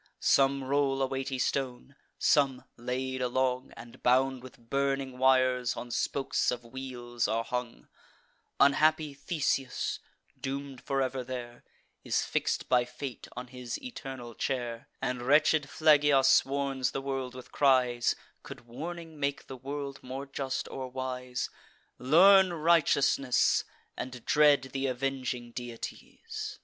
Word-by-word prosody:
Some 135 0 +3
roll 135 0 +1
a - - +4
weighty 135 0 -3
stone; 130 +1 -2 0.2
some, 135 -3 +3
laid 130 +2 -3
along, 130 +1 0
And 120 - -12
bound 130 +1 +3
with 130 -1 -12
burning 135 +1 -2
wires, 130 -1 +3
on 120 - -6
spokes 135 +3 0
of 125 -1 -2
wheels 120 -1 -4
are 115 +1 0
hung 125 -1 -5 0.7
Unhappy 155 +1 +4
Theseus, 140 -3 -1 0.4
doom'd 135 -1 -5
for 135 0 0
ever 130 0 -2
there, 120 -1 -7 0.4
Is - - +1
fix'd - - -1
by 125 -1 +4
fate 125 +1 -7
on 125 0 -6
his 125 -1 -6
eternal 135 - -7
chair; 120 -2 -3 0.2
And 125 -1 -1
wretched 145 +2 +3
Phlegyas 145 -3 +5
warns 135 -1 -1
the 135 - -2
world 135 -2 -3
with 130 - -10
cries 125 -4 +3 0.3
(Could - - -10
warning 160 +6 -8
make 140 0 -1
the 135 - -8
world 140 +1 -6
more 130 +2 -6
just 135 -1 -3
or 130 -1 -5
wise): 125 -1 -3 0.5
'Learn 185 +7 +6
righteousness, 150 -5 +3 0.3
and 125 -2 -7
dread 145 -3 +4
th' 135 0 -2
avenging 130 -2 -2
deities. 120 -1 -7
130 Hz, 130 wpm, -30 LUFS, 125-140 Hz, 0.7 s, Learn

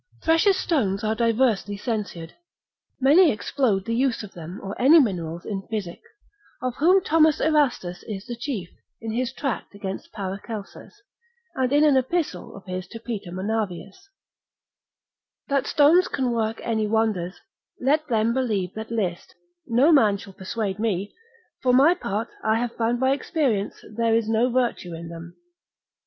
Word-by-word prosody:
Precious 330 +4 +4
stones 225 - 0
are 215 0 +1
diversely 225 -3 +1
censured; 200 -7 -4 0.7
many 300 +5 +6
explode 215 -3 0
the 230 - -2
use 250 -1 0
of 205 - -9
them 175 +2 -8
or 195 +1 -5
any 300 +6 +8
minerals 175 - -1
in 200 -3 -3
physic, 205 -6 -4 0.6
of 255 -1 -2
whom 365 +5 +4
Thomas 315 -1 +4
Erastus 270 - +1
is 200 -2 -5
the 240 -1 -5
chief, 235 -7 -4 0.3
in 225 -1 -5
his 245 +2 -1
tract 265 -6 -4
against 195 -1 -6
Paracelsus, 205 - -7 0.5
and 260 -1 0
in 290 +1 +4
an 295 -3 +5
epistle 260 - -2
of 195 - -12
his 185 0 -5
to 230 - -9
Peter 220 -6 -6
Monavius, 210 - -4 1.4
That 275 -1 +1
stones 325 +5 +5
can 260 -3 -1
work 225 -1 -1
any 220 -2 0
wonders, 205 -5 0 0.4
let 300 +4 +1
them 230 -2 +1
believe 215 -8 -1
that 220 0 -7
list, 195 -7 -3 0.3
no 255 +8 +4
man 220 -10 +5
shall 195 0 -12
persuade 195 +1 -4
me; 205 -3 -1 0.5
for 250 -1 +2
my 280 +7 +6
part, 220 - -3
I 220 0 +2
have 235 0 -3
found 235 +1 0
by 260 +1 +3
experience 275 - -1
there 230 0 +2
is 225 -1 +1
no 225 +3 +2
virtue 235 -8 -1
in 165 0 -8
them. 170 +1 -10
225 Hz, 155 wpm, -24 LUFS, 195-265 Hz, 1.4 s, any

